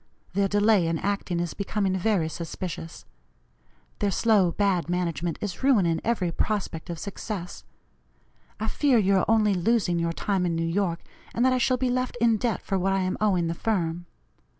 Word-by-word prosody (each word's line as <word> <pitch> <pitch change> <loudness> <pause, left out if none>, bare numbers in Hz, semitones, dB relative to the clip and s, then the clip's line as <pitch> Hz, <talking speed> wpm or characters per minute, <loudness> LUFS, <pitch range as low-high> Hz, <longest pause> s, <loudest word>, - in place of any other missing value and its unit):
Their 200 0 +2
delay 205 -3 +3
in 165 0 0
acting 195 -2 -2
is 175 -1 -2
becoming 200 -1 -1
very 190 -3 +1
suspicious. 165 0 -6 0.9
Their 205 - +1
slow, 200 -3 +3
bad 185 -3 0
management 175 -1 -1
is 195 -4 -4
ruining 195 -12 +3
every 205 -7 0
prospect 185 -3 -2
of 170 - -4
success. 200 -1 -6 0.9
I 220 - -2
fear 275 +1 +2
you 195 -2 +3
are 185 - +2
only 215 -2 +3
losing 185 -2 +1
your 170 0 0
time 190 +2 -1
in 170 -2 0
New 165 0 -1
York, 170 0 -1 0.3
and 240 - +2
that 260 - +4
I 255 - +1
shall 255 +1 +2
be 250 0 0
left 255 0 -1
in 230 -1 +3
debt 225 -2 -1
for 195 -2 -1
what 195 +1 +1
I 195 - +1
am 185 0 -1
owing 190 -5 +2
the 165 - -1
firm. 175 -3 -2
195 Hz, 180 wpm, -26 LUFS, 170-215 Hz, 0.9 s, that